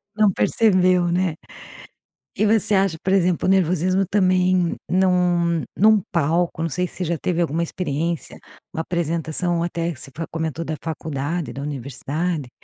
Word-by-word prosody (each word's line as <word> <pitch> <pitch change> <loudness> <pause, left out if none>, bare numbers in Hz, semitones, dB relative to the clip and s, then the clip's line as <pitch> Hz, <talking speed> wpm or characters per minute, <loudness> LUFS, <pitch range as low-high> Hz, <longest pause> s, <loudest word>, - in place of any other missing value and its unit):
não 210 -2 +4
percebeu 185 -4 +3
né? 180 -2 0 1.0
E 215 - +2
você 215 -1 +2
acha 190 -4 +2
por 190 - +1
exemplo, 180 -2 +2
o - - +4
nervosismo 185 +1 +2
também 185 -2 +2
num 175 -2 +2
num 215 0 +5
palco 170 +1 0
não 165 - -1
sei 180 +4 -1
se - - -15
você 185 - -2
já 170 0 -1
teve 175 +2 -1
alguma 165 0 0
experiência, 170 -1 -3 0.3
uma 160 - -2
apresentação 170 0 -1
até 170 0 -2
você 135 - -10
fa 165 - -4
comentou 160 0 -3
da 155 - -3
faculdade, 160 0 -3
da 140 - -6
universidade. 145 +2 -3
170 Hz, 150 wpm, -22 LUFS, 160-185 Hz, 1.0 s, num